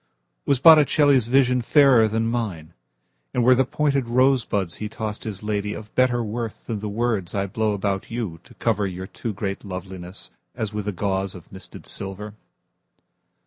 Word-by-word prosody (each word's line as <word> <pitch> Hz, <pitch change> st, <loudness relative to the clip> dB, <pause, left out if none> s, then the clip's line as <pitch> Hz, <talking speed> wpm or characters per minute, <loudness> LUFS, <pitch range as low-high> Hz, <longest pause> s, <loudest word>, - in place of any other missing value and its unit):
Was 140 Hz, -, +3 dB
Botticelli's 145 Hz, -4 st, +6 dB
visionFairer 125 Hz, -1 st, +4 dB
than 115 Hz, +1 st, 0 dB
mine; 100 Hz, -9 st, -3 dB, 0.6 s
And 120 Hz, -, +2 dB
were 130 Hz, +2 st, +6 dB
the 130 Hz, +1 st, +3 dB
pointed 140 Hz, 0 st, 0 dB
rosebudsHe 115 Hz, -6 st, +1 dB
tossed 110 Hz, -1 st, -5 dB
his 105 Hz, -2 st, -6 dB
ladyOf 105 Hz, 0 st, -3 dB
better 125 Hz, -2 st, +2 dB
worthThan 115 Hz, 0 st, -5 dB
the 105 Hz, +1 st, -4 dB
words 105 Hz, -4 st, -1 dB
I 100 Hz, 0 st, 0 dB
blow 105 Hz, +2 st, -1 dB
about 100 Hz, +1 st, -2 dB
youTo 100 Hz, -8 st, -6 dB
cover 105 Hz, -3 st, 0 dB
your 95 Hz, 0 st, -6 dB
too 115 Hz, +4 st, -5 dB
great 100 Hz, -1 st, -4 dB
lovelinessAs 95 Hz, -, -8 dB
with 105 Hz, -1 st, -4 dB
a -, -, 0 dB
gauzeOf 95 Hz, -2 st, -3 dB
misted 95 Hz, -, -11 dB
silver? 100 Hz, +2 st, -6 dB
105 Hz, 140 wpm, -23 LUFS, 95-120 Hz, 0.6 s, Botticelli's